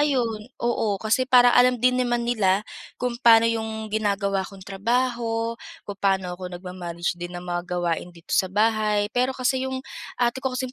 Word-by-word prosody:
ayun, 245 -7 +1 0.2
oo, 225 -4 0
kasi 225 +6 0
parang 245 -1 +6
alam 250 0 +5
din 250 +2 +2
naman 240 -1 0
nila 210 -4 +1 0.3
kung 245 -1 -3
pa'no 230 -1 +7
yung 220 -1 -2
ginagawa 200 -2 0
kong 195 -1 -13
trabaho, 230 +2 -1 0.3
kung 200 -1 -7
paano 190 -2 +1
ako 180 0 -7
nagma-manage 175 -1 -5
din 175 0 -6
ng 175 - -8
mga 175 0 -4
gawain 175 -1 -1
dito 165 - -10
sa 185 - +3
bahay. 210 +1 +1
Pero 255 +1 0
kasi 260 +1 0
yung 260 0 -5 0.3
ate 245 +1 0
ko 255 -1 -2
kasing 255 0 -3
220 Hz, 175 wpm, -24 LUFS, 190-245 Hz, 0.3 s, pa'no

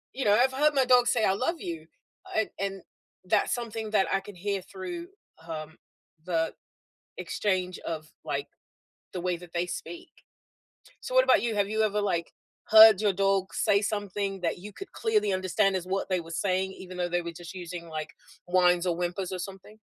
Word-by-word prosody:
You 265 - -2
know, 205 - +5
I've 260 +1 +3
heard 295 +2 +3
my 265 -1 +4
dog 250 -1 +5
say 230 -2 +3
I 190 - +3
love 260 - 0
you, 160 -2 -6 0.5
and 220 - +1
and 195 -1 -3 0.4
that's 205 +3 +2
something 225 -2 -5
that 210 -3 +3
I 195 - +3
can 195 +1 -11
hear 195 +2 -2
through, 350 - -7 0.4
um, 160 0 -6 0.5
the 165 -3 0 0.7
exchange 185 -3 -1
of, 155 -1 -5 0.2
like, - - -2 0.7
the 180 - -2
way 180 -1 0
that 175 -1 -13
they 175 +1 0
speak. 345 - -7 0.9
So, - - -6
what - - +7
about - - +5
you? 235 -2 0
Have 200 -1 +2
you 220 +1 0
ever, 210 -1 +1
like, 175 -5 -1 0.4
heard 220 -2 +9
your 210 -2 +3
dog 195 0 +1
say 200 0 +3
something 205 -2 -2
that 170 - -1
you 205 +3 -9
could 390 - -9
clearly 430 - +1
understand 190 +1 +1
is 185 -2 -2
what 195 +1 -1
they 185 -2 +1
were 165 0 -11
saying 190 +2 0
even 185 -1 -10
though 175 -1 -1
they 175 0 0
were 170 0 -5
just 170 +1 -9
using, 175 -1 -7
like, 155 -1 -5 0.3
whines 180 0 +3
or 175 - +1
whimpers 175 +2 -3
or 185 - -4
something? 195 +3 -9
195 Hz, 195 wpm, -28 LUFS, 175-215 Hz, 0.9 s, heard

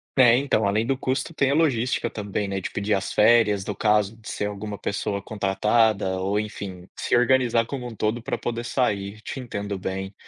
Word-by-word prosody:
Tem 125 0 +6
então, 110 -7 +1
além 105 +3 +1
do 135 0 0
custo, 135 +5 -2
tem 140 -3 +2
a - - +3
logística 125 -6 +1
também, 105 -1 -3
né. 95 0 -2
De - - -4
pedir 100 +1 -1
as 95 0 -1
férias 105 -3 +4
no 105 - -3
caso 105 0 +2
de 110 - -10
ser 105 - -2
alguma 105 0 -5
pessoa 100 0 -2
contratada 105 -1 +1
ou, 100 +2 0
enfim, 95 -4 -6
se - - +1
organizar 120 -1 +3
como 125 0 -5
um 115 - -8
todo 110 +3 -1
para - - -3
poder 120 0 -4
sair, 110 -4 -1
te 135 - -6
entendo 100 -5 -4
bem. 95 +1 -4
105 Hz, 200 wpm, -24 LUFS, 100-120 Hz, -, Tem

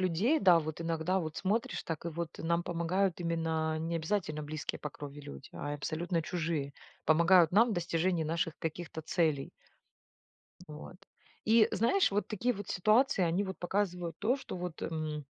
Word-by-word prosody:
людей. 190 - +2
Да, 180 -3 +7
вот 155 0 -4
иногда 165 +3 0
вот 155 -2 -5
смотришь, 210 +4 -1
так 165 -1 -4
и - - -1
вот 170 0 -4
нам 170 +1 0
помогают 175 +2 0
именно 160 -2 -1
не 165 +1 -2
обязательно 160 -2 -2
близкие 150 +1 -4
по 150 - -4
крови 145 +1 -9
люди, 70 - -10
а 145 0 -4
абсолютно 165 +3 -2
чужие 160 -5 -2 0.3
помогают 170 +2 +5
нам 230 +5 +5
в - - 0
достижении 170 -1 0
наших 165 0 -1
каких-то 165 0 -5
целей. 155 -4 0 1.2
Вот, 150 +4 -9 0.5
и 220 0 +6
знаешь 235 - +3
вот 205 +1 0
такие 235 +4 0
вот 205 -2 -7
ситуации 215 +2 +3
они 175 +4 +1
вот 190 -1 -5
показывают 180 -3 -1
то, 235 +5 +2
что - - -7
вот, 175 -2 -6
м 155 -2 -3
170 Hz, 165 wpm, -32 LUFS, 160-190 Hz, 1.2 s, Да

